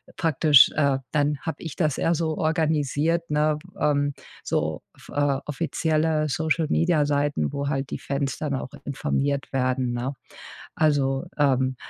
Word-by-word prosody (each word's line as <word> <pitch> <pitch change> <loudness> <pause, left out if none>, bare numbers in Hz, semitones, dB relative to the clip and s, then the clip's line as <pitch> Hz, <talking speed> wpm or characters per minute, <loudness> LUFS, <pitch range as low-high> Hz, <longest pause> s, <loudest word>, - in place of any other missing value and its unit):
praktisch, 150 -3 +5
äh, 140 -3 +2
dann 145 -1 +1
habe 160 - -4
ich 160 - -6
das 155 -5 0
eher 165 - +2
so 160 -1 -1
organisiert, 160 +1 0
ne? 150 0 +2 0.2
Ähm, 145 -1 +2 0.3
so - - -1
off - - -17
äh 145 -2 +1
offizielle 155 0 0
Social-Media 160 +1 +1
Seiten, 145 - 0
wo 140 0 -2
halt 135 -1 -2
die - - -4
Fans 140 0 -3
dann 150 -2 -3
auch 130 -1 -3 0.2
informiert 140 0 -1
werden, 130 -1 0
ne? 125 +3 -3 0.6
Also, 140 -3 +1
ähm, 130 -2 +2
145 Hz, 140 wpm, -24 LUFS, 135-155 Hz, 0.6 s, praktisch